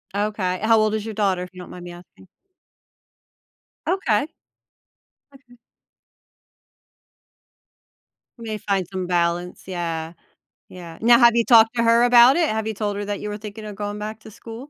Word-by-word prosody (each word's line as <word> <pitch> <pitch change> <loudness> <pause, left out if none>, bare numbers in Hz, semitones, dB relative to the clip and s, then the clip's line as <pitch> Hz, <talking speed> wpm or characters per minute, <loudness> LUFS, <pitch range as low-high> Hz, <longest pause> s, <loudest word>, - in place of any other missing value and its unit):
Okay 200 -3 -2
how 225 0 +4
old 215 0 +1
is 215 -1 -4
your 220 - -6
daughter, 195 -4 0
if 180 - -9
you 185 - -12
don't 180 - -10
mind 180 - -10
me 175 - -8
asking? 175 - -16 1.6
Okay. 280 - 0 1.0
Okay. 260 -3 -20 2.8
We 230 - -11
may 215 -1 -4
find 195 -3 -2
some 185 -1 -4
balance, 175 0 -1
yeah. 165 -3 -4 0.6
Yeah 170 -3 -11
now, 235 +1 +6
have 235 -1 +5
you 235 - +2
talked 225 -1 +5
to 230 - +1
her 230 +1 +4
about 245 +2 +6
it? 340 -2 +1
Have 220 0 -2
you 220 - -2
told 205 0 -3
her 205 - -4
that 205 0 -4
you 210 - -5
were 210 - -5
thinking 215 +1 -9
of 210 -1 -8
going 205 +1 -5
back 215 +1 -6
to 220 - -13
school? 230 +5 -11
210 Hz, 170 wpm, -22 LUFS, 185-230 Hz, 2.8 s, now